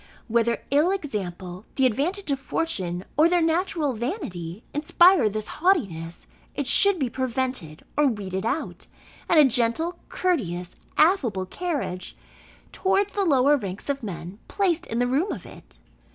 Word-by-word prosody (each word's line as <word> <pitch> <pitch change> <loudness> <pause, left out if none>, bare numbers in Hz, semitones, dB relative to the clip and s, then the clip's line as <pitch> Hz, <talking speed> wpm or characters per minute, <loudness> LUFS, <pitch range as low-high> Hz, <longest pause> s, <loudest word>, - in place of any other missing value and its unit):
Whether 235 0 +1
ill 295 +5 +4
example, 190 - -4
the 265 - +3
advantage 305 - 0
of 275 - 0
fortune 190 - -2
or 315 +3 +6
their 355 0 +3
natural 330 -3 +1
vanity, 215 - -5
inspire 305 - +5
this 215 +1 -4
haughtiness, 195 - -1 0.3
it 285 - -2
should 395 +8 +5
be 275 -5 0
prevented 255 - -3
or 295 0 +4
weeded 195 -5 -3
out; 235 +8 -3 0.4
and 330 - +6
a 300 - +8
gentle, 250 +8 0
courteous, 180 - -1 0.2
affable 255 - +3
carriage 260 - -4 0.5
towards 385 +1 +1
the 400 -1 +1
lower 280 -2 +4
ranks 200 -3 -5
of 275 0 -5
men 190 -2 -7
placed 355 -4 0
in 230 - -3
the 245 - +2
room 280 +11 +1
of - - -6
it. - - -14
265 Hz, 145 wpm, -25 LUFS, 200-330 Hz, 0.5 s, a